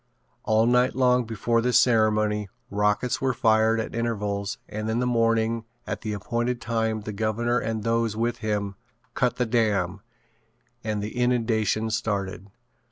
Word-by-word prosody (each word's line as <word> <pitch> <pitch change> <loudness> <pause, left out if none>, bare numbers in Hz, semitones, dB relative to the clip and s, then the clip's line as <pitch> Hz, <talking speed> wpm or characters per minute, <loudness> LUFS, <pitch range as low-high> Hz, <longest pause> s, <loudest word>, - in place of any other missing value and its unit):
All 110 +1 +3
night 125 +1 +3
long 125 -1 +3
before 115 +1 0
this 125 +1 +4
ceremony 110 -3 +2 0.2
rockets 105 +4 +1
were 130 -2 +1
fired 110 0 +3
at 110 - -4
intervals 105 -2 -2
and 110 +1 -4
in 110 - 0
the 125 - +1
morning 115 -1 +1 0.2
at - - -4
the 110 - -3
appointed 120 +4 -2
time 110 -2 -1
the 105 +1 -6
governor 115 +3 0
and 110 -1 -3
those 115 -1 0
with 120 +1 -1
him 105 -3 -2 0.4
"cut 125 - +1
the 125 - 0
dam" 105 -5 0 0.8
and 105 -2 -2
the 105 - -5
inundation 115 -3 +1
started. 100 -4 -2
110 Hz, 150 wpm, -25 LUFS, 105-120 Hz, 0.8 s, this